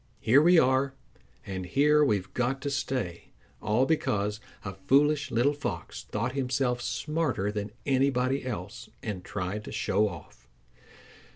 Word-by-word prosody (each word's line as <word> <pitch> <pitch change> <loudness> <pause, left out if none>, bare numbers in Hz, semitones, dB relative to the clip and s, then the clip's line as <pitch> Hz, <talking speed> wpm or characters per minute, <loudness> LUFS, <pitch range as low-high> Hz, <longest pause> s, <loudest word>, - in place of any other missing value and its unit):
Here 130 +6 +5
we 175 +3 +6
are, 135 -1 +3 0.5
and 95 -1 -4
here 150 +10 +4
we've 100 -8 0
got 125 +2 0
to 140 - -1
stay, 130 -11 -2 0.4
all 110 +5 +2
because 105 -9 0 0.3
a 95 - -4
foolish 145 +8 +2
little 125 +4 +2
Fox 100 - -5
thought 115 +4 -2
himself 125 -2 0
smarter 150 - -1
than 105 0 -3 0.2
anybody 135 0 +1
else 115 0 -6
and 100 -5 -4
tried 100 +2 -4
to - - -7
show 105 +2 +1
off." 80 -8 -12
125 Hz, 135 wpm, -28 LUFS, 105-140 Hz, 0.5 s, we